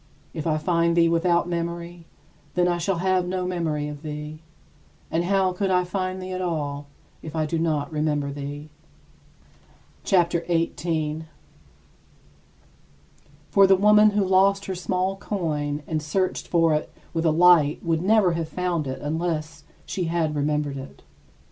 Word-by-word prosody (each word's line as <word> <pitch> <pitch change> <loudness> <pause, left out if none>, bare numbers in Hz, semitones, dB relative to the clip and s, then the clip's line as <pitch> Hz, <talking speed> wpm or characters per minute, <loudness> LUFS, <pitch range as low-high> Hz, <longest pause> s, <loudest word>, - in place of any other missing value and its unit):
If 160 -1 -4
I 155 -1 +2
find 170 +1 +1
thee 170 0 +5
without 170 +1 +2
memory, 170 0 -4 0.5
then 180 0 +3
I 175 -1 0
shall 180 +1 0
have 185 0 +1
no 185 0 -2
memory 160 -5 -2
of 145 -1 -7
thee; 150 0 -7 0.7
and 170 +2 0
how 190 -1 +2
could 195 +1 -1
I 180 -1 +3
find 185 +1 -3
thee 185 0 -6
at 185 0 -3
all, 145 -5 -3 0.3
if 160 0 -8
I 155 -1 +1
do 160 +2 -2
not 155 -3 -1
remember 150 -2 -1
thee? 145 +2 -7 1.3
CHAPTER 175 -3 +2
XVIII 165 -1 +1
27. 160 -1 -2 2.2
For 195 -1 +6
the 190 - +6
woman 210 +2 +6
who 205 -1 +1
lost 195 +1 +3
her 190 - -3
small 185 +1 -1
coin 150 -7 -3
and 155 -1 -2
searched 185 +5 -1
for 165 -2 +3
it 150 - -2 0.2
with 165 -1 -1
a - - +5
light 160 -2 +4
would 165 -1 +1
never 200 -1 +4
have 165 -1 -3
found 175 -4 -2
it 130 - -4
unless 160 +1 -3 0.2
she 180 - -3
had 165 -2 0
remembered 145 -1 -1
it. 135 +1 -10
170 Hz, 155 wpm, -24 LUFS, 155-185 Hz, 2.2 s, For